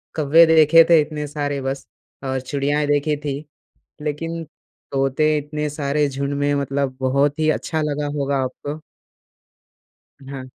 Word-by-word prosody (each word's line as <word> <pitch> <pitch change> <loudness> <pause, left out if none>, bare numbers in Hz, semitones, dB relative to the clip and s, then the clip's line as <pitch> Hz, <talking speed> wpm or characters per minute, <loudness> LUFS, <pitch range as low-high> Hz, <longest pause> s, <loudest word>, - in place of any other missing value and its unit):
कौवे 160 +2 +6
देखे 160 0 +7
थे 165 -2 +7
इतने 150 0 -4
सारे, 145 -1 -3
बस, 135 +1 -4 0.4
और 130 0 -1
चिड़ियाएँ 145 +2 -1
देखी 145 +1 +1
थीं। 145 -1 -4 0.6
लेकिन 165 +3 -3 0.5
तोते 135 +3 +1
इतने 150 +1 -3
सारे 145 0 0
झुंड 140 +1 -3
में 145 0 +1
मतलब 140 -1 -1
बहुत 140 +3 +1
ही 155 0 +2
अच्छा 160 +1 -2
लगा 150 0 -2
होगा 140 0 0
आपको। 145 +4 -5 1.5
हाँ। 135 -2 -6
145 Hz, 135 wpm, -21 LUFS, 140-150 Hz, 1.5 s, देखे